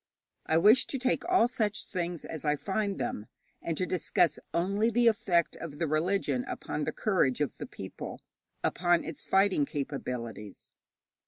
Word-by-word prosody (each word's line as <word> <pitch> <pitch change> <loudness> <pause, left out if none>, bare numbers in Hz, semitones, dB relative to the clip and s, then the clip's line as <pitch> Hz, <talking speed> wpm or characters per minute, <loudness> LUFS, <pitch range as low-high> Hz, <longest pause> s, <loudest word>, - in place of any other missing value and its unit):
I 160 - +3
wish 215 +9 +6
to 275 - -3
take 255 0 0
all 365 -10 +5
such 220 -3 -1
things 175 -3 -4
as 160 - -6
I 150 -1 +2
find 200 +5 -2
them, 105 - -3 0.3
and 165 -2 -3
to 185 - +1
discuss 180 -1 +1
only 200 +6 +1
the 240 +1 +2
effect 185 -7 +2
of 150 -3 -7
the 165 - 0
religion 155 -4 +1
upon 150 - -4
the - - -1
courage 180 - +1
of 150 - -2
the - - -5
people, - - -8 0.4
upon 175 -1 +2
its 155 -3 -6
fighting 195 -5 +3
capabilities. 125 -7 -5
175 Hz, 160 wpm, -30 LUFS, 150-205 Hz, 0.4 s, wish